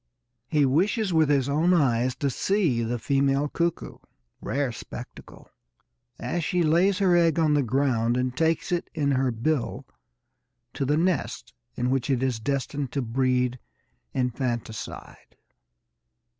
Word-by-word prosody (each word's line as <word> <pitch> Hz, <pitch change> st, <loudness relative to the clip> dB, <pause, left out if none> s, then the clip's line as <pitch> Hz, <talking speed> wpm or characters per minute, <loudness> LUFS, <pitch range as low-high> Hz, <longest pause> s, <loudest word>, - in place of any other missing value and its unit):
He 150 Hz, 0 st, +2 dB
wishes 190 Hz, -, +1 dB
with 160 Hz, -2 st, +3 dB
his 140 Hz, -3 st, +2 dB
own 160 Hz, +6 st, +3 dB
eyes 130 Hz, -5 st, +2 dB
to 140 Hz, -2 st, -1 dB
see 170 Hz, -, +1 dB
the 120 Hz, +1 st, -1 dB
female 140 Hz, +3 st, +1 dB
cuckoo 170 Hz, +3 st, -2 dB, 0.4 s
rare 140 Hz, -2 st, -1 dB
spectacle! -, -, -10 dB, 0.7 s
as 175 Hz, -1 st, -3 dB
she 180 Hz, +2 st, +1 dB
lays 175 Hz, +5 st, +3 dB
her 185 Hz, -3 st, +3 dB
egg 170 Hz, -2 st, +3 dB
on 155 Hz, -2 st, +3 dB
the 145 Hz, -, +3 dB
ground 120 Hz, -2 st, +1 dB
and 125 Hz, 0 st, -1 dB
takes 165 Hz, +3 st, 0 dB
it 175 Hz, -1 st, -1 dB
in 140 Hz, -2 st, +1 dB
her 130 Hz, -1 st, +2 dB
bill 125 Hz, +4 st, -2 dB, 0.9 s
to 135 Hz, -, -2 dB
the 145 Hz, +3 st, +2 dB
nest 175 Hz, -2 st, -1 dB, 0.2 s
in 125 Hz, +1 st, -1 dB
which 135 Hz, 0 st, -1 dB
it 130 Hz, -2 st, +1 dB
is 130 Hz, -4 st, 0 dB
destined 140 Hz, +2 st, -2 dB
to 140 Hz, -, -1 dB
breed 125 Hz, +1 st, 0 dB, 0.5 s
infanticide. 120 Hz, -3 st, -4 dB
140 Hz, 140 wpm, -26 LUFS, 125-160 Hz, 0.9 s, with